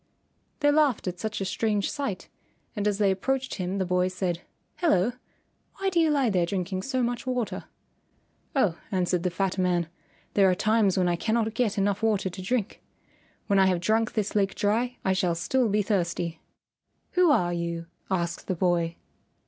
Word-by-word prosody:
They 290 0 +5
laughed 290 -9 +2
at 180 0 -3
such 215 +1 -3
a - - -1
strange 210 +1 0
sight, 245 -11 -4 0.5
and 210 -1 0
as 205 -1 +1
they 205 -2 +3
approached 260 +7 -1
him 185 0 -3
the 190 - 0
boy 180 0 +2
said, 180 -2 -2 0.4
"Hello! 240 - +3 0.6
Why 390 0 -1
do 345 - +2
you 325 -1 +4
lie 275 -6 +2
there 180 -3 +2
drinking 185 0 -2
so 260 +3 -1
much 240 +1 -2
water?" 250 -3 -2 0.9
"Oh," 200 -11 +2
answered 180 -2 +1
the 180 - 0
fat 190 +1 -1
man, 175 -2 +1 0.5
"there 195 -2 +5
are 180 - +3
times 210 -1 +2
when 180 -1 +3
I 175 - +2
cannot 220 +2 0
get 230 -4 0
enough 200 +1 +1
water 210 -4 +1
to 185 - -7
drink. 215 +2 -2 0.6
When 200 -2 +3
I 190 - +5
have 180 -2 +2
drunk 220 +5 +1
this 215 -2 -1
lake 200 -2 +1
dry 235 +5 0
I 190 - +3
shall 180 -2 +1
still 240 +8 +1
be 210 +1 +2
thirsty." 175 -4 -1 0.7
"Who 360 -2 +4
are 175 -12 +3
you?" 170 -1 -3 0.2
asked 170 -3 -2
the 185 - 0
boy. 170 -1 +1
195 Hz, 180 wpm, -27 LUFS, 180-225 Hz, 0.9 s, They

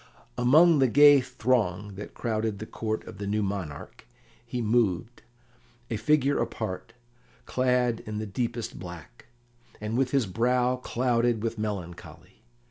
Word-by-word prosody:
Among 150 +6 +5
the 135 - +5
gay 145 +2 +7
throng 105 -6 -1
that 100 +2 -9
crowded 110 -3 -2
the 110 - -6
Court 110 0 -4
of 105 -3 -11
the 100 - -4
new 105 +1 0
monarch 95 -7 -6 0.4
he 120 +1 -5
moved, 115 -1 0 0.7
a - - 0
figure 140 +5 +2
apart, 110 +1 -4 0.5
clad 125 -2 +1
in 105 -1 -4
the 110 - -3
deepest 115 +3 -4
black, 85 -9 -11 0.5
and 105 +1 -4
with 130 0 +1
his 135 -3 +2
brow 125 +5 +1
clouded 120 -2 0
with 115 -1 -3
melancholy. 100 -5 -7
115 Hz, 135 wpm, -27 LUFS, 105-125 Hz, 0.7 s, gay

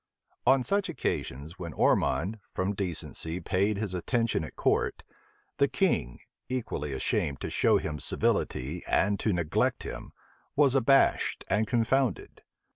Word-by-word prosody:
On 135 -1 +5
such 200 +8 0
occasions 75 +8 -3
when 85 -3 -6
Ormond, 90 +12 +1 0.2
from 95 +2 0
decency, 90 -3 -3
paid 100 +4 0
his 100 -3 -3
attendance 110 -2 0
at - - -14
court, - - 0 0.5
the - - +4
king, - - 0 0.3
equally 110 - -3
ashamed 70 +1 -1
to - - -4
show - - +4
him 75 -1 -4
civility 70 +8 -1
and 100 +1 +2
to 110 - +1
neglect 85 -4 0
him, - - -7 0.4
was 140 -2 +4
abashed 135 +1 +3
and 105 +2 +2
confounded. 120 +2 0
95 Hz, 130 wpm, -29 LUFS, 80-120 Hz, 0.5 s, On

